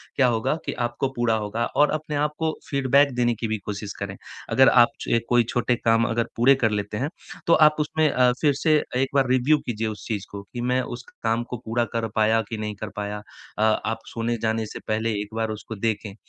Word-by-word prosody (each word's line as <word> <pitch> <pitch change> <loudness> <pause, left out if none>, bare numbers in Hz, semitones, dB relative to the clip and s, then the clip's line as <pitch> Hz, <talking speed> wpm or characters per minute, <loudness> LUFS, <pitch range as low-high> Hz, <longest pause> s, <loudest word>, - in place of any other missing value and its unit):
क्या 130 -2 +4
होगा 120 +5 +1
कि - - -2
आपको 120 +3 -2
पूरा 120 -1 +1
होगा 115 +3 -2
और 150 - +5
अपने 155 -1 -3
आप 150 +1 +1
को 160 -1 +1 0.2
फीडबैक 140 +1 +3
देने 120 -1 +2
की 115 - 0
भी 110 0 -1
कोशिश 100 -1 -5
करें। 100 -1 -4 0.4
अगर 130 0 +7
आप 120 -1 +6
छ 115 - +1
कोई 120 -1 +4
छोटे 120 0 +1
काम 115 0 +2
अगर 115 0 0
पूरे 135 +4 +6
कर 110 -5 +1
लेते 105 0 -2
हैं, 140 +7 -1 0.4
तो 170 - +5
आप 155 -1 +6
उसमें 155 +1 +1
अ, 125 -2 +3
फिर 145 -2 +4
से 155 -2 +4 0.2
एक 130 +1 +1
बार 135 -2 +3
रिव्यु 130 +4 +4
कीजिए 110 -1 -2
उस 105 -1 -7
चीज़ 105 -3 -3
को 100 0 -6
कि 120 +4 -7
मैं 130 0 +2 0.2
उस 125 - -12 0.2
काम 115 +1 +1
को 125 - -4
पूरा 120 +1 0
कर 115 -1 -1
पाया 110 +1 +3
कि 110 - -4
नहीं 105 -1 -4
कर 105 - -4
पाया, 105 0 -4 0.4
अ, - - -2
आप 110 +1 +1
सोने 115 0 -1
जाने 110 0 0
से - - -8
पहले 110 +1 0
एक 105 +1 -8
बार 110 -1 -1
उसको 110 - -8
देखें 105 -1 -2
115 Hz, 230 wpm, -24 LUFS, 110-130 Hz, 0.4 s, अगर